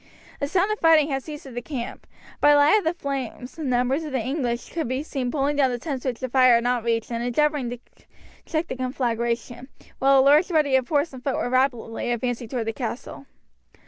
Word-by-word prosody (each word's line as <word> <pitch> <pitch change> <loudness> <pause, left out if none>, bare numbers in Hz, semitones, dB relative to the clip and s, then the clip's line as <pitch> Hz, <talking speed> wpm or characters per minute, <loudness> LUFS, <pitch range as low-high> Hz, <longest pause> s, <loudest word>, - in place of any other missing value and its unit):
The 285 - -1
sound 380 +6 +1
of 425 - -2
fighting 320 -2 +5
had 270 0 -1
ceased 300 +2 -9
at 265 - -10
the 245 - -4
camp. 245 -2 -6 0.3
By 295 - +6
the - - +5
light 290 +8 +6
of - - -7
the 325 +2 +1
flames 270 -2 -5
numbers 260 +1 0
of 305 - -6
the 265 - 0
English 245 -1 -2
could 325 -5 -3
be 260 +3 -2
seen 265 -5 -3
pulling 285 +2 0
down 270 -2 +4
the 245 - -2
tents 265 0 -5
which 250 -3 -2
the 260 - -2
fire 255 -1 +5
had 235 - +2
not 245 +1 +2
yet - - -14
reached 230 0 0
and 235 0 -2
endeavouring 285 +1 +1
to 245 - -5 0.7
check 315 +1 -1
the - - -4
conflagration, 240 -1 -2 0.3
while 275 +1 +5
a - - +7
large 295 +5 +5
body 305 -5 +2
of 260 -2 +1
horse 295 0 +1
and 255 -1 -10
foot 275 -1 -1
were 245 - -2
rapidly 245 -3 0
advancing 240 0 -2
toward 235 0 -3
the 225 - -2
castle. 255 +3 -6
260 Hz, 230 wpm, -24 LUFS, 245-290 Hz, 0.7 s, a